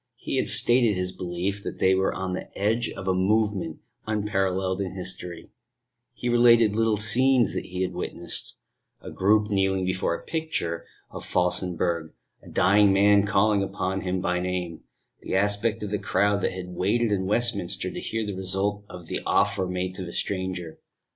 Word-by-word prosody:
He - - -4
had - - +1
stated 120 -3 +4
his 90 0 -2
belief 90 +3 -3
that - - -6
they 95 - +3
were 95 0 +1
on 95 -1 -4
the 90 - -5
edge 115 +4 +1
of 95 - -8
a 95 - +3
movement 95 -3 0 0.3
unparalleled 95 -3 -1
in 95 -1 -4
history: 90 -2 -4 0.6
he 125 - -6
related 120 -3 +5
little 110 -1 +2
scenes 120 +3 +4
that - - -3
he 90 +1 -3
had 90 0 -3
witnessed 85 -1 -3 0.4
a - - -9
group 105 +2 +2
kneeling 95 -1 +1
before 95 -2 0
a - - -10
picture 155 - -3 0.2
of - - -8
Felsenburgh, 90 -2 -1 0.3
a - - -14
dying 100 +2 +4
man 100 +1 +4
calling 100 0 +3 0.4
him 90 0 -2
by 90 -1 0
name, 90 -2 -3 0.4
the - - -3
aspect 105 +3 +1
of 105 - -4
the 105 - -1
crowd 100 0 +1
that - - 0
had 90 -1 -7
waited 105 +6 0
in 95 -2 0
Westminster 105 -4 -1
to - - -6
hear 115 -1 -3
the 100 - -4
result 95 +2 -1
of 90 -2 -10
the - - -4
offer 100 -2 +1
made 90 0 -3
to 95 - -5
the 85 - -8
stranger. 95 -4 -4
95 Hz, 175 wpm, -25 LUFS, 90-105 Hz, 0.6 s, related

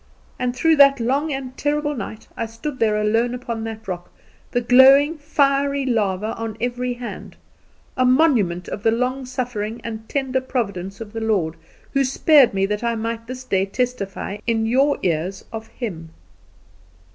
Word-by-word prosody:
And 250 0 -1
through 320 +4 +3
that 275 -1 +7
long 275 +6 0
and 265 -2 -5
terrible 295 +1 -1
night 220 -1 -7
I 230 - -3
stood 255 +5 -6
there 215 -2 +2
alone 225 +3 +1
upon 235 -2 -5
that 220 -1 -7
rock, 175 -2 -5 0.4
the 245 - 0
glowing, 270 +6 +6
fiery 280 -2 +1
lava 215 -3 0
on 225 -1 -5
every 245 +1 -2
hand 240 -1 -8 0.6
a 255 - +2
monument 250 - +3
of - - -5
the 225 - +3
long 250 +3 -1
suffering 240 -3 -3
and 220 -1 -7
tender 265 -2 0
providence 200 -6 -3
of 215 -1 -8
the 225 - -4
Lord, 190 -8 0 0.4
who 275 - +3
spared 275 0 +5
me 195 0 +1
that 210 +3 -2
I 235 0 0
might 230 +1 -4
this 255 +1 -7
day 195 -5 0
testify 205 -3 -3
in 225 -1 +1
your 270 +5 +3
ears 180 +2 -1
of 225 0 -6
Him. 170 -10 -6
235 Hz, 165 wpm, -21 LUFS, 215-260 Hz, 0.6 s, that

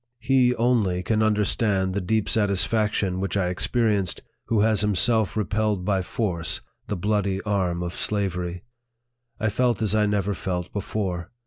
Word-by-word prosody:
He 125 0 +3
only 110 -7 +1
can 110 +3 +1
understand 105 -2 +1
the 100 - -1
deep 110 +3 0
satisfaction 105 -2 +1
which 95 +1 -1
I 90 -2 +1
experienced, 100 0 0 0.2
who 110 -3 +1
has 110 -2 +3
himself 105 +1 +2
repelled 105 -3 0
by 95 -1 +1
force 90 -3 -2 0.3
the 105 - -2
bloody 100 0 0
arm 90 -4 0
of 85 0 -4
slavery. 90 -3 -1 0.8
I 110 -1 +1
felt 120 0 +1
as 110 -2 0
I 105 -1 +3
never 100 -1 0
felt 90 -2 -4
before. 95 -4 -3
105 Hz, 145 wpm, -24 LUFS, 95-110 Hz, 0.8 s, He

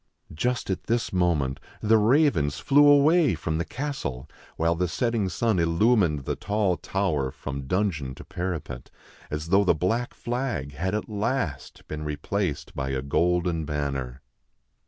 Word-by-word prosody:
Just 120 +6 -1
at 95 - -3
this 115 -2 -1
moment 75 -7 +1 0.2
the 110 +1 +4
ravens 110 - +3
flew 145 +1 +5
away 145 - +5
from 80 0 -2
the - - +1
castle, 125 - -4 0.3
while 85 +1 +2
the 90 +2 0
setting 115 0 0
sun 100 +3 +1
illumined 85 - +2
the - - -1
tall 100 -3 0
tower 85 -9 -1
from 70 0 -6
dungeon 80 -8 -1
to - - -10
parapet, 85 -9 -5 0.4
as 75 +2 -4
though 100 +2 +5
the 90 - +3
black 115 +10 -1
flag 120 - -3
had 95 +8 -2
at 105 - -3
last 105 - -3
been 75 0 -5
replaced 75 +3 -3
by 65 -1 -2
a 65 -1 -2
golden 85 +3 +1
banner. 70 -4 -3
90 Hz, 150 wpm, -26 LUFS, 75-110 Hz, 0.4 s, flew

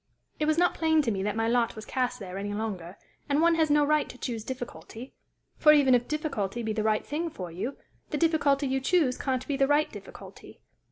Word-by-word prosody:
It 305 - +1
was 310 +1 +2
not 350 +1 +3
plain 320 -1 +2
to 235 - 0
me 195 -2 -2
that 205 +1 -1
my 225 0 0
lot 235 0 +1
was 215 0 -8
cast 250 0 -1
there 190 -2 -6
any 205 +1 -4
longer, 195 -5 -5 0.3
and 285 +1 +2
one 335 +1 +4
has 320 -2 +2
no 295 0 +4
right 305 0 +1
to - - -10
choose 235 -4 -4
difficulty; 245 0 -8 0.4
for, 300 -1 +7
even 280 -3 +5
if 245 -1 +2
difficulty 240 -8 -2
be 220 -1 -2
the 215 - -1
right 215 0 +1
thing 325 +3 -2
for 180 - -7
you, 210 +11 -5 0.3
the 300 - -2
difficulty 295 -3 +2
you 265 0 0
choose 290 -4 +2
can't 260 -2 -2
be 280 - -1
the 270 0 +3
right 295 +1 +2
difficulty. - - -12
260 Hz, 225 wpm, -28 LUFS, 220-300 Hz, 0.4 s, for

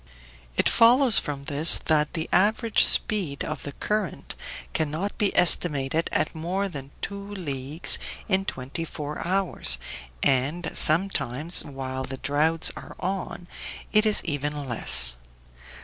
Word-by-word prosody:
It - - +1
follows 240 0 +5
from 140 -1 -7
this 150 +2 +5
that 150 -1 0
the 165 -1 -5
average 215 +3 +2
speed 180 -10 +2
of - - -6
the 140 - -9
current 210 -1 -4 0.4
cannot 160 +6 -3
be 205 -3 +1
estimated 160 -3 +2
at - - -2
more 180 +5 -4
than 140 -7 -10
two 200 +1 -7
leagues 145 -3 +3 0.3
in 190 -2 -1
twenty 135 +2 -6
four 150 -2 -8
hours, 180 - +1 0.5
and 145 +6 -1
sometimes, 160 -3 +1
while 130 -1 -7
the 135 0 -8
droughts 155 +4 +1
are - - -12
on, 185 -1 -6 0.4
it 215 0 +3
is 210 - +2
even 145 -2 -4
less. 65 - +5
160 Hz, 130 wpm, -24 LUFS, 140-195 Hz, 0.5 s, follows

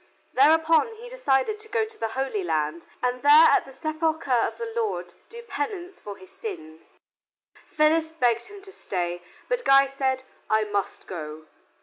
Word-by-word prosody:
Thereupon 320 - +4
he 475 +2 -11
decided 425 - 0
to 435 - -9
go 450 -1 +1
to 440 0 -11
the 225 - -2
Holy 265 -7 -1
Land, 160 0 -2 0.2
and 250 0 0
there, 295 +3 +8
at - - +3
the 270 - -12
Sepulcher 310 +1 -2
of 245 - +1
our 460 -1 -5
Lord, 455 -2 -2 0.2
do 470 +1 -10
penance 395 -5 -5
for 205 -1 -8
his 185 - -15
sins. 160 - -9 0.7
Phyllis 315 +1 +2
begged 240 -7 0
him 405 -1 -12
to 390 - -11
stay; 175 - -3 0.3
but - - -1
Guy 275 0 +6
said, 265 -1 -1 0.3
"I 215 0 +3
must 205 -2 -3
go." 155 -3 -7
280 Hz, 165 wpm, -25 LUFS, -, 0.7 s, there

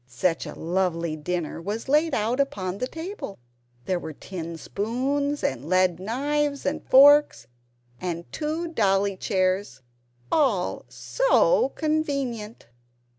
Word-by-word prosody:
Such 145 +8 -1
a - - -7
lovely 170 -2 -1
dinner 165 +1 -3
was 210 +7 -4
laid 305 +4 +3
out 230 +5 0
upon 200 -9 -1
the 250 - -1
table! 325 - -7 0.5
There 185 -2 0
were 160 - -7
tin 170 +1 -7
spoons, 270 - -2
and 135 +4 -2
lead 185 -2 +3
knives 280 +7 -1
and - - -1
forks, 290 - +6 0.5
and 170 -2 -4
two 315 +3 -3
dolly 200 -7 +1
chairs 185 - -1 0.5
all 240 - +1
SO - - +2
convenient! 275 -8 -2
210 Hz, 120 wpm, -25 LUFS, 180-285 Hz, 0.5 s, forks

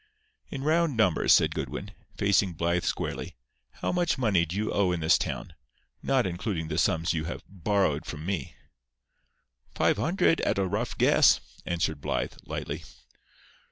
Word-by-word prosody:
"In 135 -1 -5
round 160 -3 +2
numbers," 100 -7 +3
said - - +5
Goodwin, 100 +1 -5 0.3
facing 100 -2 +2
Blythe 85 +2 0
squarely, - - -3 0.3
"how - - -3
much 175 -2 +1
money 100 -9 +2
do 85 - -5
you 105 +2 -1
owe 95 -3 +2
in 90 - -1
this 80 0 +4
town, 85 - -3 0.5
not 135 -4 +2
including 85 -2 -3
the 80 0 -1
sums 85 -2 +1
you 80 -1 -2
have 85 - -6
'borrowed' 95 -4 0
from 75 0 -6
me?" 95 -2 -3 1.2
"Five - - +2
hundred—at 165 - +1
a 100 - +1
rough 105 +6 -2
guess," - - +5 0.3
answered 80 -4 -1
Blythe, - - -2
lightly. - - -4
95 Hz, 150 wpm, -27 LUFS, 85-110 Hz, 1.2 s, said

